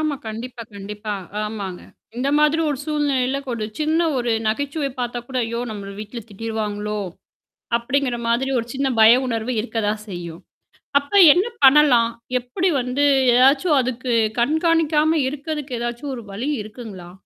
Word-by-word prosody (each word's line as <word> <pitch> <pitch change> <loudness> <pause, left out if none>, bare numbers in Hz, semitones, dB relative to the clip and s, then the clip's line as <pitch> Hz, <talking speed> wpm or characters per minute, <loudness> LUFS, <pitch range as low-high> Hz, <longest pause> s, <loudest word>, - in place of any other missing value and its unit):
ஆமா. 310 -2 0
கண்டிப்பா, 230 +2 -6
கண்டிப்பா. 205 +1 -5 0.3
ஆமாங்க. 200 -4 -5 0.3
இந்த 265 +3 -1
மாதிரி 300 +2 +3
ஒரு 275 - -2
சூழ்நிலையில 275 -3 0
ஒரு 230 -3 -2 0.2
சின்ன 315 +2 +2 0.2
ஒரு 240 -1 0 0.2
நகைச்சுவை 280 +4 -2
பாத்த 240 -1 -3
கூட, 260 - -5
"ஐயோ! 235 +1 -3
நம்மள 200 -2 -7
வீட்டுல 215 +3 -7
திட்டிருவாங்களோ!" 210 0 -4 0.8
அப்பிடிங்கிற 250 +1 -1
மாதிரி 255 +3 +1
ஒரு 230 - -3
சின்ன 270 0 0
பய 220 +1 +9
உணர்வு 230 +1 -2
இருக்கதான் 215 -2 -2
செய்யும். 170 -3 -7 0.6
அப்ப 285 +6 -13 0.2
என்ன 370 +4 +2 0.2
பண்ணலாம்? 265 -4 +6 0.3
எப்பிடி 280 +10 -1
வந்து 250 +3 -1 0.3
எதாச்சும் 275 +5 +4
அதுக்கு 250 0 -2 0.3
கண்காணிக்காம 315 +2 +2
இருக்குறதுக்கு, 290 -3 -5
எதாச்சும் 240 +4 -4
ஒரு 235 - -9
வழி 245 +9 -3
இருக்குங்களா? 210 -5 -10
245 Hz, 135 wpm, -21 LUFS, 220-285 Hz, 0.8 s, பய